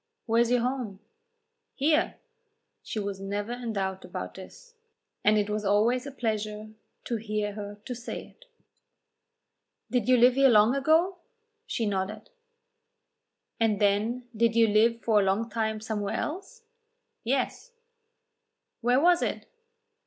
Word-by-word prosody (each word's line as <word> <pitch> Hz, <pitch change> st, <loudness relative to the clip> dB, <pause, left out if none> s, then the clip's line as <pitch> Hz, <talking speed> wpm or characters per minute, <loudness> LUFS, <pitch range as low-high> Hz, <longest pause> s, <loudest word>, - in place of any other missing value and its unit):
"Where 230 Hz, 0 st, +3 dB
is 235 Hz, -, +2 dB
your 245 Hz, -1 st, +3 dB
home?" 245 Hz, -6 st, -3 dB, 0.8 s
"Here." 305 Hz, +4 st, +2 dB, 0.7 s
She -, -, -6 dB
was 200 Hz, -2 st, -3 dB
never 205 Hz, +3 st, -3 dB
in 240 Hz, -2 st, -4 dB
doubt 190 Hz, -2 st, -2 dB
about -, -, -6 dB
this, -, -, -13 dB, 0.5 s
and 210 Hz, +1 st, +4 dB
it 205 Hz, -1 st, +1 dB
was 210 Hz, 0 st, -2 dB
always 225 Hz, +6 st, +2 dB
a -, -, -6 dB
pleasure 215 Hz, -3 st, -3 dB, 0.3 s
to 215 Hz, -2 st, -2 dB
her 205 Hz, 0 st, -7 dB
to 250 Hz, -, -4 dB
say 240 Hz, 0 st, -6 dB
it. -, -, -22 dB, 1.5 s
"Did 245 Hz, -2 st, 0 dB
you 255 Hz, -, +6 dB
live 245 Hz, +1 st, +6 dB
here 270 Hz, +1 st, +5 dB
long 215 Hz, +1 st, +5 dB
ago?" 325 Hz, +7 st, +2 dB, 0.5 s
She 230 Hz, -, -1 dB
nodded. 205 Hz, +1 st, -3 dB, 1.3 s
"And 220 Hz, -3 st, +2 dB
then 215 Hz, +5 st, +1 dB
did 230 Hz, +1 st, +2 dB
you 230 Hz, -1 st, +5 dB
live 230 Hz, +2 st, +3 dB
for 220 Hz, -2 st, +4 dB
a -, -, +3 dB
long 205 Hz, +4 st, 0 dB
time 220 Hz, -1 st, -1 dB
somewhere 210 Hz, -2 st, -3 dB
else?" 390 Hz, +9 st, -5 dB, 0.6 s
"Yes." 270 Hz, -, -2 dB, 1.1 s
"Where 245 Hz, +2 st, +3 dB
was 350 Hz, +3 st, +4 dB
it?" -, -, -2 dB
225 Hz, 140 wpm, -28 LUFS, 210-250 Hz, 1.5 s, you